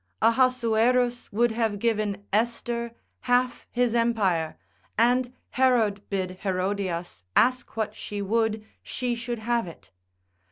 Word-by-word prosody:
Ahasuerus 245 0 +2
would 235 +3 +2
have 220 -2 0
given 205 -2 -1
Esther 235 +1 -1 0.2
half 245 0 +1
his 245 -1 +1
empire, 205 -9 +1 0.4
and 245 +2 +3 0.2
Herod 235 -6 +3
bid 185 -2 -3
Herodias 185 - -2
ask 250 -2 +2
what 215 -1 -1
she 205 -2 -6
would, 215 +1 0 0.2
she 250 -2 -2
should 235 0 -4
have 230 -1 0
it. 95 - -13
230 Hz, 115 wpm, -26 LUFS, 205-240 Hz, 0.4 s, and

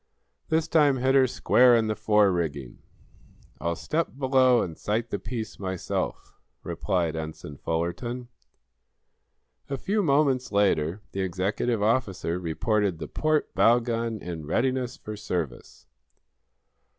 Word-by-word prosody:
"This 160 0 +1
time 150 -4 +4
hit 130 +1 +2
her 135 -1 +5
square 125 0 +4
in 115 -1 +2
the 110 0 -1
fore 105 -2 +3
rigging." 70 -8 -3 0.8
"I'll 85 +3 -1
step 155 - -2
below 130 -2 +4
and 85 -3 -6
sight 115 +6 -2
the 100 - -2
piece 115 -3 -6
myself," 95 -2 -4 0.2
replied 85 -4 -1
Ensign 80 -2 -6
Fullerton. 105 +10 -3 1.4
A 135 - -2
few 205 +9 0
moments 140 -5 +2
later 100 -2 +1
the 95 - -3
executive 100 +5 -1
officer 100 -7 0
reported 95 +3 0
the - - -6
port 155 -1 0
bow 115 +5 +5
gun 115 -1 -2
in 80 -4 -6
readiness 130 - 0
for 110 - -7
service. 85 - -5
110 Hz, 125 wpm, -26 LUFS, 90-130 Hz, 1.4 s, her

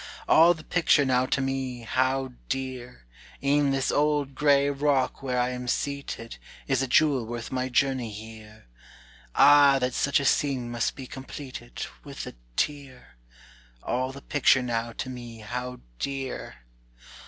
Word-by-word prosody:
"All 170 +2 +6
the 155 - -12
picture 165 -5 +3
now 130 -1 +2
to 140 - 0
me 135 -2 -3
how 130 +2 0 0.2
dear! 130 - -5 0.4
E'en 140 0 +3
this 135 -1 0
old 145 -2 +1
gray 140 0 +3
rock 140 -2 +1
where 130 -2 -2
I 125 0 +1
am 125 0 -5
seated, 140 -4 -3 0.3
Is 135 -2 +1
a 135 - 0
jewel 140 -1 +3
worth 120 0 -6
my 130 0 -1
journey 130 -2 +1
here; 110 - -11 0.7
Ah 140 0 +7
that 125 -1 -1
such 140 +1 +2
a 140 - -2
scene 130 -4 +1
must 120 -1 -1
be 135 - -8
completed 130 - -8 0.2
With - - -7
a - - -8 0.2
tear! 140 - -3 0.7
All 130 +1 -1
the 140 +1 -11
picture 135 -2 +3
now 115 -1 -2
to - - -5
me 120 -3 -8
how 125 +3 -5 0.2
dear! 135 - -5
130 Hz, 150 wpm, -26 LUFS, 125-140 Hz, 0.7 s, Ah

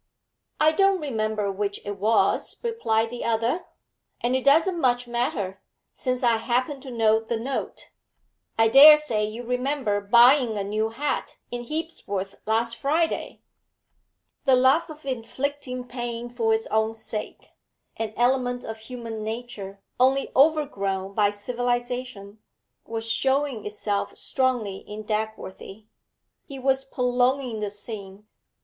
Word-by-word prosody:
'I 310 +1 +5
don't 390 +3 +3
remember 215 - -1
which 200 +1 -2
it 205 -1 -5
was,' 220 +3 +1
replied 230 - 0
the 245 - -5
other, 230 +8 0 0.5
'and 245 +2 0
it 260 - 0
doesn't 330 +5 +4
much 245 -2 +2
matter, 210 -6 -2 0.3
since 255 -1 -2
I 235 -2 +4
happen 255 +4 -1
to 270 - -9
know 225 -2 +3
the 225 +1 -3
note. 260 +5 -4 0.7
I 225 0 +5
dare 295 +6 +10
say 240 -9 -1
you 215 +3 -4
remember 250 -3 -1
buying 235 +2 +5
a 200 - -1
new 215 +2 -1
hat 280 +6 -3
in 240 0 -5
Hebsworth 205 - -4
last 230 +1 +1
Friday?' 320 +4 -1 1.0
The 265 -2 +6
love 265 +7 +4
of 310 -2 -11
inflicting 260 +1 -3
pain 240 -1 -5
for 235 -2 0
its 220 0 +1
own 220 +1 +1
sake, 220 -1 -6 0.4
an 225 -1 -3
element 245 0 +1
of 220 0 -6
human 225 -1 -7
nature 215 -4 -6 0.2
only 265 +2 +3
overgrown 200 -11 +2
by 205 -1 +3
civilisation, 240 -1 -3 0.5
was 225 0 -4
showing 265 -1 0
itself 210 -1 -3
strongly 245 -7 0
in 210 +2 -9
Dagworthy. 215 -1 -5 0.6
He 275 - -9
was 265 0 +1
prolonging 250 -2 0
this 205 -1 -5
scene. 205 -2 -9
240 Hz, 130 wpm, -25 LUFS, 215-265 Hz, 1.0 s, dare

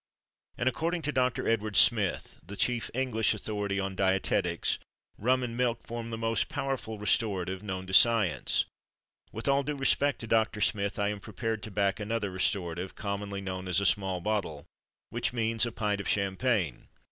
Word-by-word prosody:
And, 120 - -1
according 165 +6 0
to 150 - -1
Doctor 130 -3 0
Edward 110 -2 0
Smith 105 -6 +4
(the 100 - -9
chief 120 0 0
English 115 -5 +1
authority 105 -1 -2
on 95 0 -2
dietetics), 95 -2 +1 0.4
rum 125 +4 +2
and 115 -2 -4
milk 120 -2 0
form 115 0 -5
the 115 - -4
most 115 0 0
powerful 130 -5 -3
restorative 95 -3 0
known 95 -3 -5
to 95 - -8
science. 115 -3 +4 0.7
With 110 - -5
all 140 0 +4
due 145 +1 -3
respect 140 +1 +2
to - - -5
Doctor 110 -1 +2
Smith 100 -1 +1
I 100 0 +1
am 105 -1 -4
prepared 110 +2 -4
to 110 - -6
back 100 0 0
another 105 -1 -2
restorative, 90 -1 -1
commonly 100 -1 -4
known 95 -1 -5
as 90 0 +2
"a 100 - -1
small 95 -1 +1
bottle"; 95 -8 -2 0.5
which 120 +1 -1
means 115 0 +1
a - - -4
pint 105 -3 -1
of - - -6
champagne. 100 - 0
105 Hz, 170 wpm, -29 LUFS, 95-115 Hz, 0.7 s, Smith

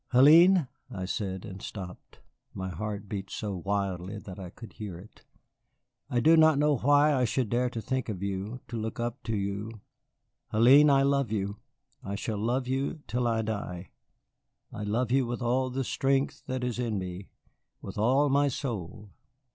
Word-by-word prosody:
"Hélène!" 165 +5 +7 0.2
I 95 -7 -5
said, 95 0 -3
and 95 -3 -8
stopped. 90 -3 -9 0.3
My 95 0 -4
heart 105 +3 -5
beat 100 -1 -5
so 105 -2 -4
wildly 100 0 -2
that 100 -2 -9
I 90 -2 -7
could 115 - -12
hear 100 -5 -7
it. 100 +5 -16 0.8
"I 120 - +1
do 160 +7 +6
not 160 -2 +6
know 150 -1 +3
why 145 +4 +4
I 130 -2 +2
should 120 -1 0
dare 125 +1 +1
to 115 -2 -5
think 130 +1 -2
of 100 -3 -4
you, 100 +5 -4
to 120 - -4
look 110 +2 -5
up 120 +2 -3
to 115 - -1
you 100 +2 -4 0.7
Hélène, 130 +7 +7
I 135 -1 +5
love 140 -4 +1
you, 100 -1 -2 0.5
I 100 - -4
shall 105 +1 -3
love 125 +4 0
you 135 +4 -2
till 120 +1 0
I 115 -1 +1
die. 100 -5 -5 0.8
I - - -6
love 115 +4 0
you 130 -1 +3
with 120 +1 -3
all 130 +2 +1
the 135 +1 -2
strength 135 +2 0
that 130 -1 -3
is 125 -1 -2
in 115 -4 -1
me, 95 0 -6 0.5
with 95 +1 -7
all 130 +7 +3
my 140 +1 +3
soul. 110 - -5
115 Hz, 180 wpm, -28 LUFS, 100-130 Hz, 0.8 s, Hélène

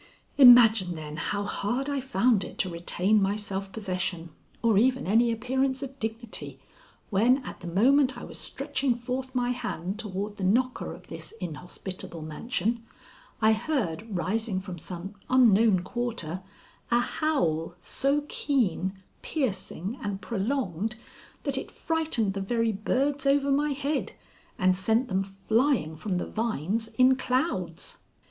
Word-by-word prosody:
Imagine, 225 -8 +8
then, 150 -1 -7
how 200 +4 -1
hard 240 +6 -1
I 285 -2 -1
found 235 -4 +2
it - - -9
to 185 - 0
retain 180 +4 +1
my 195 +1 +2
self 195 -2 -4
possession 185 -5 -3 0.3
or 225 -4 +4
even 260 +3 +2
any 230 +4 +4
appearance 260 +4 0
of 270 0 -8
dignity, 225 0 -5 0.5
when 230 +6 +4
at - - -7
the 175 - -8
moment 260 +9 +4
I - - -8
was - - -8
stretching 265 -4 -1
forth 255 +2 -4
my 245 -1 +1
hand 215 -6 -4
toward 205 -1 -4
the 195 - -5
knocker 245 +7 +1
of - - -15
this - - -8
inhospitable 180 0 -6
mansion 230 +8 -2 0.6
I 220 0 +6
heard 220 - -2
rising 195 +3 -1
from 185 -2 -7
some 180 +4 -6 0.2
unknown 225 -6 +5
quarter 190 -5 -3 0.5
a 240 - +4
howl 175 - 0
so 280 +9 0
keen, 195 - 0 0.3
piercing, 220 - -3
and 200 -2 -3
prolonged 215 - -2 0.5
that - - +1
it - - -7
frightened 315 -11 0
the 195 - -3
very 230 +3 +1
birds 275 +7 0
over 280 0 +3
my 290 +1 +2
head 280 +1 -2 0.4
and 185 -1 +3
sent 225 +7 +1
them 190 0 +1
flying 195 - +1
from 185 +3 -2
the - - -2
vines 220 -1 -1
in 255 +2 +5
clouds. 255 +5 -2
220 Hz, 140 wpm, -27 LUFS, 190-255 Hz, 0.6 s, Imagine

